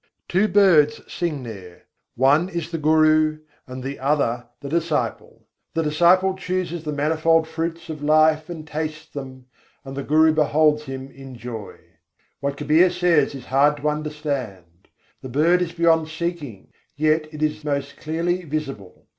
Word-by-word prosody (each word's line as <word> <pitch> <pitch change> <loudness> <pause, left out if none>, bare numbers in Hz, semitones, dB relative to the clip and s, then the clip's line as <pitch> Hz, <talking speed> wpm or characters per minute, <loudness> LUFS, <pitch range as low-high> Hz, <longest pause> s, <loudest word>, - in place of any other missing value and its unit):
Two 190 +4 +2
birds 165 -8 +4
sing 155 -6 -3
there; 95 -7 -10 0.3
one 145 +8 +3
is 170 -3 -5
the 165 - -3
Guru, 155 0 +3 0.3
and 130 0 -7
the 140 +1 -5
other 130 -4 0
the 140 - -8
disciple: 160 0 -2 0.3
The 165 - +1
disciple 175 +5 +3
chooses 180 -3 -3
the 150 - -3
manifold 160 +2 +2
fruits 165 +1 -4
of 155 -2 -7
life 155 +1 +3
and 160 -3 -7
tastes 155 +1 -4
them, 130 -2 -8 0.4
and 135 0 -7
the 140 - -3
Guru 155 +3 +4
beholds 150 0 +2
him 135 0 -7
in 135 -1 -11
joy. 115 -3 -7 0.6
What 140 0 -3
Kabîr 155 +5 +4
says 175 -6 +2
is 130 - -9
hard 145 +3 +3
to 150 +1 0
understand: 140 - -5 0.3
"The 130 - -8
bird 165 +7 +3
is 175 -2 -1
beyond 165 -2 +3
seeking, 160 - -5 0.3
yet 155 +1 +1
it 155 -1 -5
is 155 0 -1
most 140 -1 -3
clearly 170 +3 -2
visible. 140 - -6
155 Hz, 155 wpm, -22 LUFS, 140-165 Hz, 0.6 s, birds